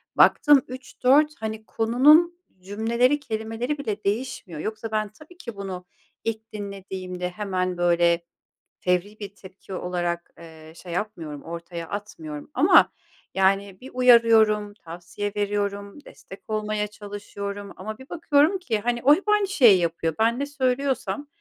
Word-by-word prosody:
Baktım 290 -3 +6
3, 255 0 -11
4, 295 +4 +5
hani, 220 0 -5
konunun 300 +12 +4 0.2
cümleleri, 230 +8 +1
kelimeleri 225 +2 -3
bile 215 -7 -4
değişmiyor. 205 -6 -3
Yoksa 220 +5 -5
ben 215 -1 -1
tabii 305 - -17
ki 235 - -8
bunu 190 -2 -6 0.4
ilk 220 -1 -4
dinlediğimde 190 -3 -5
hemen, 185 -1 -2
böyle, 170 -1 +2 0.5
fevri 180 +4 -1
bir 200 -1 -8
tepki 190 0 -12
olarak, 175 -1 -3
eee, 160 -1 -13
şey 175 0 -10
yapmıyorum. 170 -7 -5
Ortaya 170 0 -7
atmıyorum 160 - -7
ama, 330 +8 +5 0.4
yani, 195 0 +1
bir 260 - -10
uyarıyorum, 225 -4 +5
tavsiye 180 +3 -6
veriyorum, 205 +4 -3
destek 195 - -14
olmaya 215 -1 -1
çalışıyorum. 205 -1 -7
Ama 215 +3 -7
bir 265 +2 -14
bakıyorum 320 +2 +2
ki, 235 - -1
hani, 240 +2 -1
o 290 +3 +7
hep 395 +5 -5
aynı 420 -1 +3
şeyi 240 - +6
yapıyor. 165 -1 -1
Ben 230 +2 +2
ne 280 - -1
söylüyorsam 275 +1 -1
210 Hz, 135 wpm, -24 LUFS, 185-250 Hz, 0.5 s, o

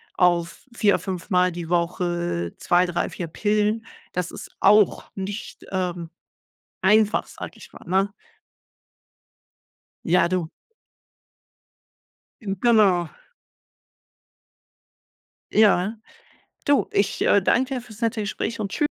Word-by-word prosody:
auf 175 +1 +1
vier 205 -3 +3
fünfmal 180 -1 0
die 170 -1 -6
Woche 175 - -1
2, 180 +1 +2
3, 175 0 -1
4 175 - -5
Pillen, 210 +5 0 0.3
das 180 -2 -2
ist - - -9
auch 210 +1 +4
nicht, 200 +3 -6
ähm, 175 -3 -2 0.7
einfach, 210 +2 +3
sage - - -8
ich - - -14
mal, - - -14
ne? 190 +3 +1 1.9
Ja, 175 +1 +4
du 180 -3 -1 1.9
Hm. 195 -3 -3
Genau. 200 -8 +4 2.4
Ja. 210 0 +4 0.7
Du, 285 -1 +3
ich, 200 -1 0
äh, 205 - +4
danke 260 +7 +2
dir 255 - -3
fürs 230 -2 -14
nette 230 -1 0
Gespräch 215 +2 -3
und 200 -2 -3
tschü 295 - +1
190 Hz, 105 wpm, -23 LUFS, 175-215 Hz, 2.4 s, auch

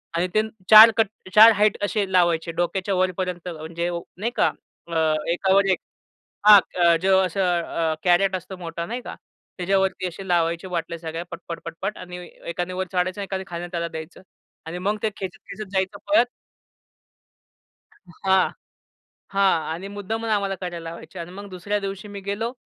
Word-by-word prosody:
आणि 175 +2 +1
ते 215 - +5 0.3
4 220 +1 +11
cut 225 -2 +4 0.3
4 220 +2 +10
height 210 0 +2
असे 205 -1 -1
लावायचे 170 -2 +2
डोक्याच्या 185 +3 -1
वरपर्यंत, 180 -1 -1
म्हणजे 170 +1 -4 0.3
नाही 230 +5 -2
का. - - +3 0.4
अ, 170 - -5 0.4
एकावर 195 +2 +3
एक - - +1 0.7
हां, 205 -2 +10 0.2
अ, 170 -1 +5
जो 190 0 +4
असं 190 +2 -2
अ, 170 -2 0
कॅरेट 185 +2 +3
असतो 185 +1 -8
मोठा 170 -1 -5
नाही 240 +5 -4
का? - - -7 0.4
त्याच्यावरती 190 0 +1
असे 190 +3 -9
लावायचे 170 +1 +1
बाटल्या 170 -1 -3
सगळ्या 165 +1 -5
पटपट-पटपट 170 +3 -6
आणि 180 -1 -8
ए - - -13 0.2
एकाने 175 +2 -3
वर 185 0 -2
चढायचं 185 +2 0
आणि - - -2
एकाने 190 -1 -4
खालून 175 0 -6
त्याला 170 -1 -2
द्यायचं 160 +3 -9 0.4
आणि 165 +2 -5
मग 205 +4 0
ते 220 - +1
खेचत-खेचत 195 +2 -7
जायचं 190 -1 -1
पळत. 300 -5 +5 2.0
हां, 190 -1 +4 0.8
हां 200 0 +2 0.3
आणि 185 +4 -6
मुद्दामून 220 +3 -4
आम्हाला 200 -2 0
करायला 170 -2 -5
लावायची 170 +2 -10
अन् 170 +1 -6
मग 200 0 -9
दुसऱ्या 200 +3 -2
दिवशी 195 +1 -5
मी 200 0 -7
गेलो 205 +4 -3
185 Hz, 160 wpm, -23 LUFS, 170-200 Hz, 2.0 s, 4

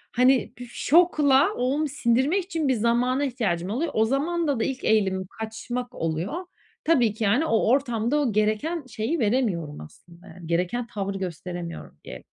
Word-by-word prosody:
Hani, 255 0 +3
şokla 300 - +3
onu 280 +5 0
sindirmek 275 +7 +1
için 325 -6 -2
bir 260 - +3
zamana 240 +4 +1
ihtiyacım 200 -9 -2
oluyor. 280 +10 -1
O 220 0 +4
zamanda 285 +1 0
da - - +1
ilk 260 -1 -3
eğilimim 190 -4 +1
kaçmak 240 +3 -5
oluyor. 165 - -2 0.5
Tabii 245 -10 +3
ki, 220 - -4
yani, 240 +11 +3
o 225 -6 +1
ortamda 245 0 +1
o 265 -6 +1
gereken 215 +10 0
şeyi 255 +7 -2
veremiyorum 205 - 0
aslında, 170 - -15
yani, 175 -3 -11
gereken 180 +8 -1
tavrı 200 -3 -4
gösteremiyorum 175 -1 -6
diyelim. - - -9
235 Hz, 150 wpm, -25 LUFS, 200-275 Hz, 0.5 s, O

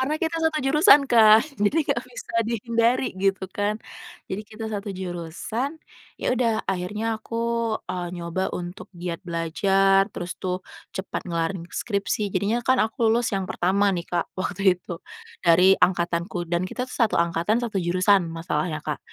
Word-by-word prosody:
karena 285 +4 0
kita 330 0 -1
1 320 -1 +2
jurusan 300 +3 +6
kan, 220 -2 +7 0.2
jadi 210 +11 +3
nggak - - +1
bisa - - -9 0.2
dihindari 235 +2 +1
gitu 195 0 0
kan, 205 +2 -1 0.5
jadi 190 - -3
kita 215 +1 -9
1 205 0 -4
jurusan. 185 - -4 0.4
Yaudah 235 -3 +1
akhirnya 210 +4 -2
aku, 230 - -6 0.5
eee, 180 -1 -3
nyoba 170 +2 -2
untuk 175 +1 -7
giat 170 -1 -4
belajar, 195 +3 +2
terus 175 0 -5
tuh 185 0 -2 0.4
cepat 190 +1 -4
ngelarin 170 +1 -2
skripsi, 200 -1 -2
jadinya 210 +6 0
kan 260 0 +4
aku 225 +1 -1
lulus 235 +1 +2
yang 195 - -2
pertama 200 0 +1
nih 175 - -2
Kak, 175 -1 -1
waktu 190 0 +2
itu 170 - -6 0.5
dari 180 +3 +6
angkatanku 175 -1 0
dan 175 +1 +1
kita 250 - -4
tuh - - -8
1 230 -3 +3
angkatan, 170 +7 +1
1 225 -4 -3
jurusan, 185 +1 +3
masalahnya, 165 -1 -2
Kak. 150 - -2
195 Hz, 155 wpm, -24 LUFS, 175-225 Hz, 0.5 s, kan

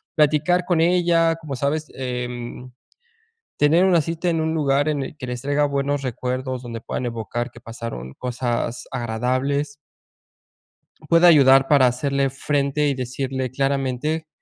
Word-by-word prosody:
platicar 155 +3 +2
con 175 -3 +2
ella, 170 -1 +3
como 155 -4 -7
sabes, 145 +4 -1
em, 125 -1 -5 0.9
tener 160 +5 +4
una 175 -3 +4
cita 165 +3 -2
en 165 -1 0
un 160 0 -1
lugar 145 -1 +1
en 145 -2 -1
el 150 - -8
que 130 - -6
les 125 -1 -4
traiga 145 +2 +1
buenos 140 0 -1
recuerdos, 130 +1 -3
donde 115 -2 -6
puedan 125 - -4
evocar 115 +1 -4
que 120 - -15
pasaron 115 - -7
cosas 120 -1 -3
agradables 130 +5 -1 1.3
pueda 170 +1 +6
ayudar 135 -4 +6
para 135 -3 +5
hacerle 135 +2 0
frente 140 +2 0
y 140 - +1
decirle 130 0 -3
claramente 140 +3 -1
140 Hz, 140 wpm, -22 LUFS, 125-150 Hz, 1.3 s, pueda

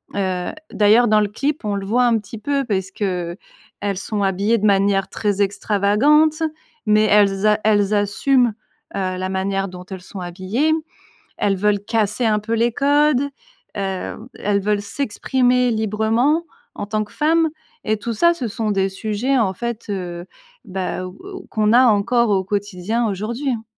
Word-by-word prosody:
heu, 185 -2 -1 0.2
d'ailleurs 220 +3 +4
dans 215 -1 +4
le 210 - +2
clip, 275 +8 -2
on 205 -1 -1
le 195 -1 -4
voit 245 +5 +2
un 235 -2 +3
petit 210 +2 -10
peu 280 +5 -1
parce 195 -4 -2
qu'elles 180 -4 -3 0.6
sont 205 +1 -2
habillées 200 +4 +1
de 215 - -1
manière 195 -1 +3
très 205 -2 -1
extravagante, 215 +11 +2 0.4
mais 215 0 +4
elles 205 -1 +3
a 210 0 +3
elles 205 -1 +3
assument, 230 +4 +2 0.4
heu, 185 -1 -2
la 185 0 -3
manière 195 +1 -1
dont 180 -1 -10
elles 190 -2 -7
sont 190 +1 -9
habillées. 190 - -1 0.6
Elles 200 -1 +1
veulent 205 +1 +1
casser 220 +1 0
un 215 -1 +3
peu 225 +2 -2
les 235 +1 +2
codes, 285 +1 +3 0.5
heu, 195 -2 -3 0.2
elles 200 0 0
veulent 205 +1 0
s'exprimer 250 +2 +1
librement 220 +8 +1 0.3
en 205 - -5
tant 215 +1 -1
que 210 - -19
femmes 320 +2 +2 0.4
et 215 0 +1
tout 230 +2 -4
ça, 340 +10 +3
ce 265 -8 -4
sont 215 +1 -2
des 195 -1 +1
sujets 215 +7 -1
en 210 -5 +2
fait, 235 +2 -5
heu, 175 -3 -5 0.4
bah, 185 -1 -4
ou 185 +1 -11 0.2
ou - - -14
qu'on 215 0 +1
a 250 +2 +7
encore 235 +2 +3
au 190 -2 +2
quotidien 205 +3 -2
aujourd'hui, 230 +8 -3
hein. 225 -3 -3
210 Hz, 170 wpm, -20 LUFS, 195-235 Hz, 0.6 s, a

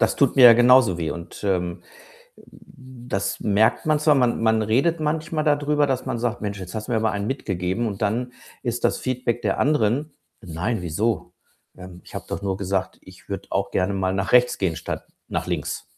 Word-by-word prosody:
Das 110 -1 +2
tut 140 -3 +3
mir 130 - +7
ja 120 - +10
genauso 120 -6 +5
weh. 80 -2 -2
Und, 85 +4 -8
ähm, 90 -3 -1 0.7
äh, - - -17 0.5
das 100 -4 -2
merkt 105 +1 +2
man 155 -1 +2
zwar. 150 -1 +4
Man 125 -4 +1
man 110 -1 +3
redet 135 +11 +1
manchmal 155 0 -1
dadrüber, 150 0 +2
dass 130 -2 -2
man - - -2
sagt: 120 0 -2
„Mensch, 100 -1 -4
jetzt 90 -1 -8
hast 110 -1 -5
du - - -5
mir 115 - +2
aber 110 0 +1
einen 100 0 -3
mitgegeben.“ 95 -4 -2
und 100 -2 -4
dann 120 +4 -1 0.3
ist 120 -1 -3
das - - +2
Feedback 125 -2 -2
der 100 -3 0
anderen: 145 +1 +1 0.3
„Nein, 90 +4 -3
wieso? 100 +7 -2 0.4
Ähm, 90 -1 -11
ich - - -14
habe - - -6
doch - - -4
nur 95 -1 -2
gesagt, 95 -1 -2
ich - - -17
würde - - -5
auch - - -1
gerne 95 +2 0
mal 95 -1 -1
nach 95 0 -2
rechts 125 0 +4
gehen 90 -4 -1
statt 80 - -5 0.2
nach - - -2
links.“ - - -3
110 Hz, 205 wpm, -23 LUFS, 95-125 Hz, 0.7 s, ja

